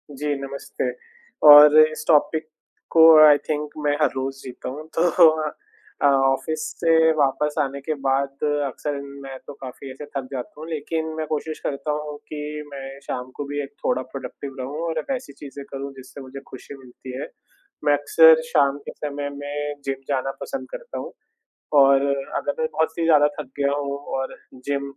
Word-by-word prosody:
जी, 145 +2 -2
नमस्ते। 140 0 -4 0.6
और 150 +1 +10
इस 155 0 +3
टॉपिक 155 0 +3 0.4
को 165 - +5 0.2
आई 150 -1 +7
थिंक 150 -1 -1 0.2
मैं 145 0 +2
हर 150 - +4
रोज़ 135 +1 -3
सीखता 125 -1 -7
हूँ 150 +4 -8
तो - - +3 0.4
अ 155 - -1 0.5
अ, - - +3
ऑफ़िस 135 +3 +1 0.2
से 160 -1 +4
वापस 145 +1 +1
आने 140 -1 -1
के 155 +3 -2
बाद 135 +1 -1 0.2
अक्सर 145 +2 -4 0.3
मैं 135 -1 -7
तो 145 - -7
काफ़ी 130 +1 -8
ऐसे 135 +3 -9
थक 140 -2 -6
जाता 130 -3 -6
हूँ, 160 - -7
लेकिन 160 +1 -3
मैं 160 - -2
कोशिश 155 +1 -3
करता 145 +2 -3
हूँ 150 0 -4
कि 150 0 -5
मैं 135 0 -8
शाम 125 +1 -4
को - - -4
भी 145 +1 -3
एक 135 - -10
थोड़ा 125 +1 +1
प्रोडक्टिव 135 0 -7
रहूँ 140 +5 -5
और 160 -1 -1
वैसी 250 - -4
चीज़ें 140 0 -10
करूँ 140 0 -5
जिससे 130 +2 -11
मुझे 135 +1 -9
खुशी 130 +2 -10
मिलती 130 0 -10
है। - - -5 0.6
मैं 145 - +5
अक्सर 160 +2 +6
शाम 140 -2 +3
के - - -4
समय 145 -1 -5
में 145 +1 -4
जिम 135 -1 -1
जाना 135 -1 0
पसंद 270 - -5
करता - - -7
हूँ - - -7 0.6
और 135 -1 +6 0.4
अगर 285 - -1
मैं 475 - +2
बहुत 160 - +1
ही 165 - +1
ज़्यादा 150 -3 +5
थक 150 - -6
गया 140 0 +1
हूँ 140 -1 -3 0.2
और 135 0 -3 0.3
जिम 140 -1 -1
145 Hz, 180 wpm, -23 LUFS, 135-150 Hz, 0.6 s, और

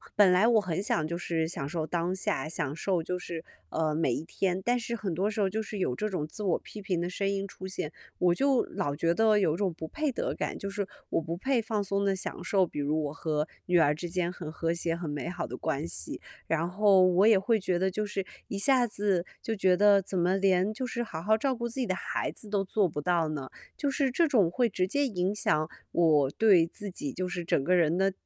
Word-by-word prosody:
本 200 -3 +6
来 190 +5 +5
我 230 -3 +5
很 180 -1 -2
想 160 -6 0
就 170 - -2
是 165 -2 -1
享 160 -4 -3
受 160 +1 -2
当 175 +3 -1
下， 155 -6 -1
享 145 -3 -2
受 175 0 -1
就 180 +2 -3
是， 170 -2 -6 0.2
呃， 155 -1 -1
每 150 -6 +1
一 - - -3
天， 185 +2 -1
但 245 0 +2
是 235 +1 -3
很 195 -6 -3
多 195 +5 0
时 215 0 -2
候 195 - +2
就 220 +3 -2
是 215 -1 -6
有 155 -10 0
这 210 - -2
种 165 -6 -2
自 160 - -9
我 180 -4 +2
批 210 - -10
评 190 -4 -1
的 175 - -1
声 195 +2 -1
音 195 0 -1
出 190 0 -8
现， 170 -5 -4 0.3
我 180 -1 +3
就 270 +6 +2
老 145 0 -3
觉 165 +3 +1
得 220 +2 +4
有 175 -6 +2
种 195 -2 0
不 160 0 -7
配 300 - -1
得 - - -2
感， - - -3
就 200 - -5
是 200 -1 -3 0.2
我 - - +1
不 165 +1 -4
配 255 +4 +1
放 215 -2 -1
松 200 0 -1
地 195 -1 +2
享 190 - -4
受， 195 -2 +3
比 150 - -7
如 145 +2 0
我 145 - -4
和 155 -1 -1 0.2
女 180 -1 +4
儿 150 -3 +4
之 170 +3 -5
间 175 0 -1
很 160 -4 -7
和 165 +1 -1
谐、 170 -1 0
很 170 -1 -5
美 145 +2 -3
好 175 - -4
的 - - -6
关 155 -1 -2
系。 85 - -2 0.3
然 165 +1 0
后 195 +1 +4
我 185 +3 +4
也 220 - +7
会 215 +3 +2
觉 185 -2 0
得 190 +1 +2
就 210 +3 -2
是 200 -2 -3 0.2
一 200 - -4
下 250 +4 +4
子 200 -4 0 0.2
就 225 - -2
觉 185 -3 +3
得 200 0 +6
怎 190 0 -4
么 180 +2 +2
连 195 +1 +2
就 235 - -5
是 240 0 -2
好 160 -8 -6
好 220 +5 +3
照 265 +3 0
顾 235 0 -3
自 235 - -5
己 255 - +1
的 185 - 0
孩 - - -2
子 215 - -9
都 200 -1 +1
做 195 +1 +1
不 150 - -4
到 170 0 +1
呢？ 145 -4 -4 0.3
就 285 - 0
是 275 -1 +1
这 330 +6 +3
种 220 - +3
会 245 +7 +2
直 185 -2 0
接 285 +8 +1
影 185 -4 -1
响 155 -6 +1 0.2
我 155 -5 +4
对 195 -5 +5
自 205 +4 -7
己 145 -6 -4
就 185 0 -2
是 180 -1 -4
整 140 - +1
个 180 - +2
人 165 -2 +3
的 195 +1 +2
185 Hz, 275 characters per minute, -29 LUFS, 165-210 Hz, 0.3 s, 也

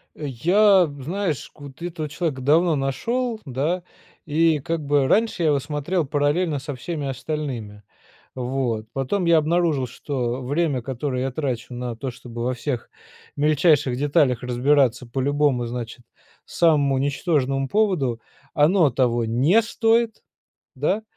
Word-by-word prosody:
Я 180 - +3
знаешь, 170 +1 -3
вот 145 0 -12
этого 165 -3 -4
человека 150 -3 -3
давно 160 +4 +3
нашел, 225 - -1
да, 150 +7 -1 0.4
и 160 +1 +3
как 165 +3 -3
бы 145 -1 +2
раньше 220 -2 +1
я 160 - +3
его 140 -2 +2
смотрел 155 +4 -2
параллельно 145 +3 0
со 140 +1 -6
всеми 145 +3 -5
остальными, 130 -8 -5 0.5
вот. 125 -4 -2
Потом 135 +8 -1
я 170 -1 +5
обнаружил, 155 -4 +1
что 125 0 -3
время 145 -1 0
которое 130 +1 -3
я 135 - -1
трачу 130 -4 -3
на 120 -1 -4
то, 130 +3 -4
чтобы 120 -1 -8
во 125 +1 0
всех 125 -1 -4 0.5
мельчайших 145 -3 +3
деталях 135 -3 +2
разбираться 125 0 +2
по 125 +3 -3
любому, 140 -3 +1
значит, 120 0 -6 0.4
самому 145 -5 +2
ничтожному 135 -2 0
поводу, 175 - +1 0.3
оно 160 +1 +4
того 120 -2 +1
не 140 - +3
стоит, 225 0 +1 0.5
да, 185 +11 0
145 Hz, 135 wpm, -23 LUFS, 130-165 Hz, 0.5 s, я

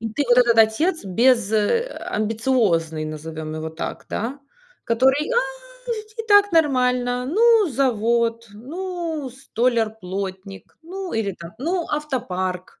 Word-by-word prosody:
И 225 - -3
ты 290 - 0
вот 245 - +5
этот 235 -2 +4
отец 225 - +3
без, 230 +2 +2
э, 220 - +2 0.2
амбициозный, 210 -8 0
назовем 155 0 -6
его 155 0 -4
так, 160 - -6
да. 255 +6 -4 0.4
Который: 265 - +2
"А, 475 - +4 0.5
ведь 430 -1 -7
и - - -1
так 410 -1 +6
нормально, 250 -5 +2
ну 440 - +4
завод, 235 -3 0
ну 325 - -5
столяр-плотник, 215 -6 -3
ну 370 +2 -6
или 220 -3 -1
там, 170 0 -9
ну 340 +6 -1
автопарк, 185 -12 -3
240 Hz, 125 wpm, -22 LUFS, 205-300 Hz, 0.5 s, так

